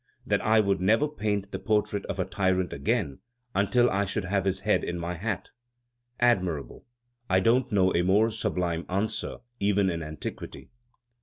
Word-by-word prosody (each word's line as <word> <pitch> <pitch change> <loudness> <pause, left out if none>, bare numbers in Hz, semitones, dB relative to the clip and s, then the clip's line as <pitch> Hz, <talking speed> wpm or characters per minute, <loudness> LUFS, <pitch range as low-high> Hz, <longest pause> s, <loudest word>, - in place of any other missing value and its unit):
"That - - +1
I 110 0 +4
would 100 -2 0
never 110 +10 +3
paint 105 -8 -2
the - - -4
portrait 105 -1 0
of 95 - -4
a 95 - +1
tyrant 95 -2 0
again 100 - -1 0.3
until 120 +5 +3
I 100 -3 +1
should 95 +1 -3
have 95 0 0
his 95 0 0
head 105 - +2
in 85 - -3
my 85 +1 -3
hat." 100 +3 -4 0.7
"Admirable! 95 - 0 0.4
I 95 0 +4
don't 120 +6 +2
know 95 -2 +3
a 85 - +3
more 100 +5 +3
sublime 90 -6 -2
answer, 100 +4 -2 0.2
even 100 -1 +2
in 85 -1 -3
antiquity." 75 -1 -7
100 Hz, 165 wpm, -27 LUFS, 90-110 Hz, 0.7 s, I